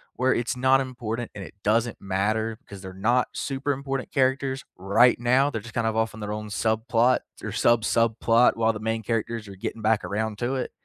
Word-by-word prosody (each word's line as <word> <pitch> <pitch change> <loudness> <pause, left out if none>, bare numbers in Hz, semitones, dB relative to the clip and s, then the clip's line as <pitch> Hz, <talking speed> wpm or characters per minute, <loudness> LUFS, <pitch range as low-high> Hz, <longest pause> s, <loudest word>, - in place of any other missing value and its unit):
where 130 +1 +2
it's 120 +1 -2
not 130 +1 +4
important 120 -2 -4
and 100 - -7
it 95 - -11
doesn't 115 +2 +1
matter 110 +4 -1
'cause 100 -2 -10
they're 95 -1 -8
not 120 +6 +1
super 135 +1 -2
important 135 -1 -3
characters 135 0 0
right 100 +7 +4
now, 130 +4 +3
they're 110 -6 -4
just 110 +1 -11
kinda 115 -1 +1
off 110 0 0
on 110 - -10
their 105 0 -4
own 105 0 -5
subplot 115 +4 +2 0.2
or - - -4
sub 120 -1 +3
subplot 115 +1 +3
while 115 0 +2
the 105 - -6
main 110 0 -1
characters 115 -1 -2
are 100 - -9
getting 110 +3 -5
back 110 0 +2
around 105 +1 -2
to 125 +3 -1
it 130 - -3
115 Hz, 205 wpm, -25 LUFS, 110-125 Hz, 0.2 s, not